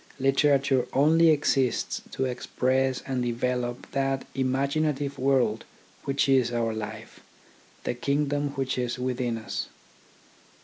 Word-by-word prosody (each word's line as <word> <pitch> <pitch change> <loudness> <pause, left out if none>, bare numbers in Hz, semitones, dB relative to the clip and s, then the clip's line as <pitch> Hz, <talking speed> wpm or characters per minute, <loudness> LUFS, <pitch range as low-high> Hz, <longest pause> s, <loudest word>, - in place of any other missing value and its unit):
Literature 135 -1 +3
only 160 +4 +5
exists 135 -4 +1
to 130 - -2
express 130 +1 0
and 130 -2 -1
develop 120 0 -2
that 135 -1 -1
imaginative 140 +2 0
world 130 -5 +2 0.4
which 140 0 +1
is 130 -3 +3
our 115 -1 0
life, 110 -1 -7 0.6
the - - -1
kingdom 145 +3 0
which 130 -2 -1
is 125 0 -2
within 125 -2 -1
us. 110 - -4
130 Hz, 115 wpm, -27 LUFS, 125-140 Hz, 0.6 s, only